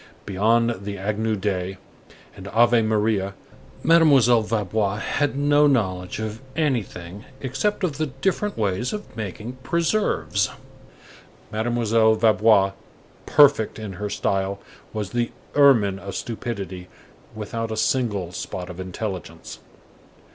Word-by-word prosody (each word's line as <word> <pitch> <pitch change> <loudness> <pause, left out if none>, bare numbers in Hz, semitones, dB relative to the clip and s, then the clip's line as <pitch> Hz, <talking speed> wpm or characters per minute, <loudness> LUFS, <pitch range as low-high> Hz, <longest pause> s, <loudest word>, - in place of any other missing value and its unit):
Beyond 115 +3 +2
the 100 0 -5
Agnus 105 +2 -1
Dei 95 -1 -2 0.6
and 100 -1 -10
Ave 120 +3 +4
Maria, 105 -3 0 0.5
Mademoiselle 140 -8 +5
Vaubois 105 -2 -1
had 140 +5 -1
no 145 +1 +4
knowledge 95 -9 0
of 110 +1 -5
anything 105 - -2 0.2
except 140 +11 -1
of 155 -5 -1
the 155 - 0
different 190 +10 -2
ways 105 +3 -1
of 210 -1 -7
making 110 +4 -6
preserves. 170 - 0 1.0
Mademoiselle 110 0 +2
Vaubois, 110 -2 +4 0.6
perfect 140 -7 +5
in 110 -3 -6
her 105 +3 -4
style, 95 0 -1 0.3
was 105 -3 -4
the 120 -1 0 0.2
ermine 115 -10 +5
of 100 -1 -7
stupidity 100 -6 -5 0.5
without 115 +2 -4
a 110 - -3
single 110 -7 0
spot 90 0 -6
of 90 - -11
intelligence. 95 -3 -6
110 Hz, 115 wpm, -23 LUFS, 100-125 Hz, 1.0 s, Mademoiselle